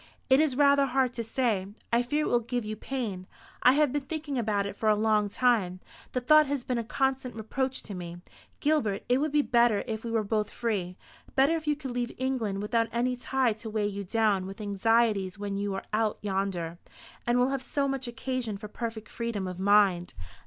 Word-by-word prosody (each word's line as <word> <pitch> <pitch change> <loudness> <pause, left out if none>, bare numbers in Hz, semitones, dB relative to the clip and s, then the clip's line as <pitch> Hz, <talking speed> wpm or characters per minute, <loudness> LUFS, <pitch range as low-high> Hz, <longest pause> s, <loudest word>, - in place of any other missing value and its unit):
"It 265 - +7
is 305 -4 +2
rather 280 0 +5
hard 260 -1 +1
to 235 - -3
say. 225 -4 0 0.3
I 235 - +5
fear 295 +5 0
it - - -1
will 240 - +3
give 240 0 -3
you 215 0 -4
pain. 215 -7 -4 0.3
I 250 - +7
have 290 -2 +3
been 290 - 0
thinking 295 0 -5
about 210 -4 0
it 200 - -5
for 215 +1 +1
a 210 - +5
long 210 -1 +2
time. 205 -6 +1 0.3
The 250 - +1
thought 305 +4 +5
has 280 -2 -2
been 250 -1 -1
a - - -2
constant 265 +1 -1
reproach 260 +4 -2
to 205 - -8
me. 175 -2 -6 0.4
Gilbert, 260 -10 +1
it 250 +2 +3
would 305 +1 0
be 295 0 +3
better 235 -5 +3
if 225 -3 -4
we 235 - -4
were 225 -1 +1
both 210 0 -1
free; 195 -6 -2 0.4
better 275 +5 +4
if 315 -2 -5
you 300 - +3
could 275 -3 -6
leave 240 0 -2
England 230 -7 -1
without 230 +2 +1
any 245 +2 0
tie 250 -1 +1
to 220 +1 -7
weigh 215 -1 0
you 200 -1 -3
down 200 -2 +1
with 195 +2 -9
anxieties 210 -1 +1
when 200 -1 -4
you 200 0 -2
are 195 - -4
out 215 0 +1
yonder, 190 -4 -2 0.5
and 240 +1 +3
will 250 +1 +3
have 270 -1 -1
so 280 +1 -1
much 270 -2 -3
occasion 235 -2 -3
for 210 +1 -8
perfect 225 0 -5
freedom 230 -5 -3
of 180 -1 -5
mind." 195 -3 +3
230 Hz, 215 wpm, -28 LUFS, 205-260 Hz, 0.5 s, It